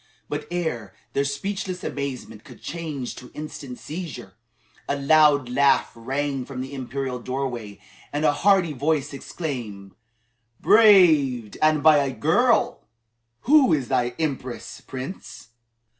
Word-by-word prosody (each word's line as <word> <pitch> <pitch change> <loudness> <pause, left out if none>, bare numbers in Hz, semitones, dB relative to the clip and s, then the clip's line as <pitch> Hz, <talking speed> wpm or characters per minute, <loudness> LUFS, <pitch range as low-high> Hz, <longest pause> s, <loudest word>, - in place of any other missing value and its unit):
But 150 0 -4
ere 155 - -3 0.2
their 140 - +1
speechless 185 +6 -4
amazement 130 -6 -5
could - - -14
change 155 -7 -5
to 125 - -11
instant 145 -4 -7
seizure, 150 - -7 0.6
a 140 - +1
loud 145 -1 +4
laugh 135 +2 +3
rang 135 +3 -3
from 130 0 -7
the 135 +2 -7
imperial 130 -1 -4
doorway 120 -5 -4 0.3
and 150 +2 -1
a - - +5
hearty 190 -1 +3
voice 145 +1 -1
exclaimed: 120 - -6 0.7
"Braved, 155 - +5
and 155 -1 +3
by 155 -1 +7
a 140 -2 0
girl! 235 - +2 0.6
Who 280 - +5
is 135 -5 -1
thy 120 0 0
Empress, 135 -6 -4
Prince? 130 - -8
140 Hz, 125 wpm, -24 LUFS, 125-160 Hz, 0.7 s, by